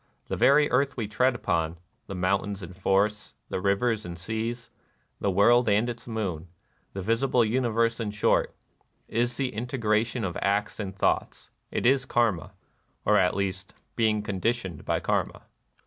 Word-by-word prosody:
The - - -1
very 145 +1 +5
earth 135 +2 +1
we 110 -4 -2
tread 125 +4 +2
upon, 80 -7 -1
— - - -45
the 95 - -6
mountains 100 +2 -1
and 90 +1 -9
forests, 100 +2 0
the - - -2
rivers 105 +3 +1
and 85 -2 -7
seas, 115 +5 -4 0.5
the 100 - 0
world 120 +5 +4
and 105 +3 +3
its 120 -1 -6
moon, 95 -8 -3 0.5
the 95 - -5
visible 115 +3 +2
uni 120 +2 +1
verse 115 +1 +1
in 110 -2 -2
short, 105 0 +1 0.3
— - - -44
is 120 +1 -1
the 130 -2 -1
integration 115 0 0
of 90 -3 -3
acts 100 +2 0
and 95 -3 -4
thoughts, 100 - -1 0.2
is 130 +2 +2
Karma, 110 -10 0 0.5
or, - - +5
at - - +2
least, 95 -1 -3 0.2
Being 110 -2 +2
conditioned 100 -3 -2
by - - +1
Karma. - - -1
110 Hz, 165 wpm, -27 LUFS, 100-120 Hz, 0.5 s, very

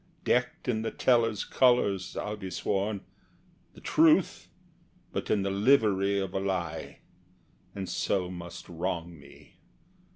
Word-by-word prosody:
Decked 125 +1 0
in 110 -3 0
the 110 - -2
teller's 115 -4 +2
colors, 120 -8 +2
I'll 105 0 -3
be 95 -3 -7
sworn; 100 +2 -1 0.7
The - - -14
truth, 160 +3 +3 0.6
but - - -4
in 100 - +2
the 100 - -1
livery 100 -3 +3
of 95 -2 -2
a - - 0
lie, 90 -4 -3 0.7
And 95 -2 -4
so 95 -2 -1
must 85 -1 -9
wrong 85 -1 -4
me. 70 0 -17
100 Hz, 130 wpm, -29 LUFS, 90-110 Hz, 0.7 s, truth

